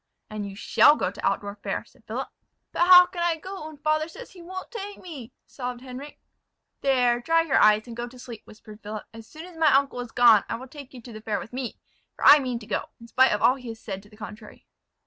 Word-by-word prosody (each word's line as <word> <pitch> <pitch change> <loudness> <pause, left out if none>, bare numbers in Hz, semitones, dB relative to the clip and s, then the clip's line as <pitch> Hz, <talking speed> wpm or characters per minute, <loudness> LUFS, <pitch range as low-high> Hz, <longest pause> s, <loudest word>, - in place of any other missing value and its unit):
"And 210 -1 -5
you 195 - -10
shall 290 +7 +5
go - - -2
to - - -11
Altdorf 205 0 -2
fair," - - -3
said - - -25
Philip. - - -4 0.4
"But 345 - +1
how 360 -1 +10
can 355 -1 -7
I 340 -1 +2
go, 370 0 -8
when 310 -1 -11
father 310 +1 0
says - - -11
he 360 - -14
won't 375 +5 -8
take 410 -3 -7
me?" 280 -9 -10
sobbed 250 -2 -6
Henric. 265 +3 -9 0.6
"There, 250 -3 +2
dry 330 +6 +2
your 300 -4 +2
eyes, 215 0 +5
and 235 -2 -9
go 240 +1 -4
to 250 +1 -14
sleep," 240 -3 -10
whispered 215 0 -14
Philip; 210 0 -6
"as 225 -1 -12
soon 315 +2 -11
as 360 -2 -13
my 315 -2 +4
uncle 275 -1 +2
is 245 -2 -6
gone 235 -4 +6
I - - -2
will 255 +3 -9
take 275 -1 -12
you 245 - -11
to 240 - -11
the 215 - -9
fair 215 -1 -2
with 225 - -10
me; 255 -2 -5 0.4
for - - -4
I 295 - +10
mean 255 -3 -3
to 225 - -10
go, - - -2
in 230 0 -14
spite 260 +2 +4
of 210 - -1
all 255 - +5
he 250 -2 -11
has 225 -1 -7
said 195 -3 -6
to 205 - -20
the 210 - -18
contrary." 215 0 -11
250 Hz, 255 wpm, -25 LUFS, 225-310 Hz, 0.6 s, how